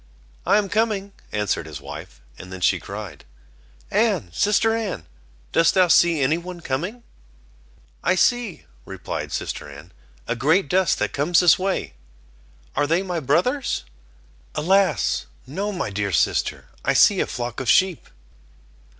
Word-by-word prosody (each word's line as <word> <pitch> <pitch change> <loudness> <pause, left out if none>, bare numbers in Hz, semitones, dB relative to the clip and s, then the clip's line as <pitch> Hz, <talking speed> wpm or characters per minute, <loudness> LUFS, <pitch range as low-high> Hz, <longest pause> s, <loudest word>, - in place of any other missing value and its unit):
"I 200 +3 +5
am 210 -1 +1
coming," 200 -1 0 0.2
answered 105 -1 -1
his - - -7
wife; - - -10 0.2
and 95 - -10
then 95 - -7
she 90 - +2
cried: 100 -7 -8 0.7
"Anne, 90 - +1
sister 215 - +2
Anne, 200 - -3 0.5
dost 165 +3 +3
thou 185 -2 +4
see 170 -2 +4
any 150 +5 +2
one 180 0 -8
coming?" 175 - -4 1.0
"I 185 - +3
see," 240 -1 +1 0.2
replied - - -6
sister 75 - -4
Anne, 75 +5 -12 0.4
"a - - -1
great 155 +8 +2
dust 185 -1 +2
that - - -2
comes 160 +5 +3
this 180 0 +5
way." 185 - -2 0.8
"Are 145 +1 +1
they 165 +5 +2
my 180 -3 -2
brothers?" 180 - 0 0.7
"Alas! 170 - +2 0.2
no, 195 +10 -3
my 175 - -3
dear 100 0 -2
sister, - - 0 0.2
I - - +2
see - - +5
a - - +1
flock 120 -1 -4
of 130 - -2
sheep." 185 -4 +3
170 Hz, 145 wpm, -23 LUFS, 120-195 Hz, 1.0 s, I